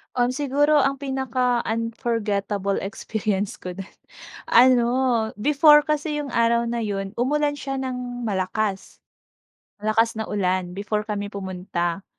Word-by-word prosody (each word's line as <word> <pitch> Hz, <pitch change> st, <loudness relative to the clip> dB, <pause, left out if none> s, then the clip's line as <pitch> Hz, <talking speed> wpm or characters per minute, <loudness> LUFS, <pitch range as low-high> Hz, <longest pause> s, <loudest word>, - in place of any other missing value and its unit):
Um, 245 Hz, 0 st, +2 dB
siguro 290 Hz, +2 st, +2 dB
ang 275 Hz, -1 st, +2 dB
pinaka-unforgettable 230 Hz, -6 st, -1 dB
experience 205 Hz, 0 st, -3 dB
ko 180 Hz, 0 st, -7 dB
din, 195 Hz, -, -6 dB, 0.6 s
ano 245 Hz, 0 st, +5 dB, 0.5 s
before 295 Hz, +6 st, +5 dB
kasi 300 Hz, 0 st, -1 dB
yung 280 Hz, -, -7 dB
araw 235 Hz, 0 st, +2 dB
na 235 Hz, -, -2 dB
'yun 200 Hz, -3 st, -3 dB
umulan 290 Hz, +3 st, +1 dB
siya 270 Hz, 0 st, -4 dB
ng 250 Hz, -1 st, -5 dB
malakas. 200 Hz, -1 st, -2 dB, 0.8 s
Malakas 220 Hz, +2 st, +2 dB
na 220 Hz, -1 st, -5 dB
ulan 185 Hz, -2 st, -1 dB
before 210 Hz, +2 st, -2 dB
kami 205 Hz, -1 st, -3 dB
pumunta 185 Hz, -2 st, -3 dB
230 Hz, 120 wpm, -23 LUFS, 200-260 Hz, 0.8 s, ano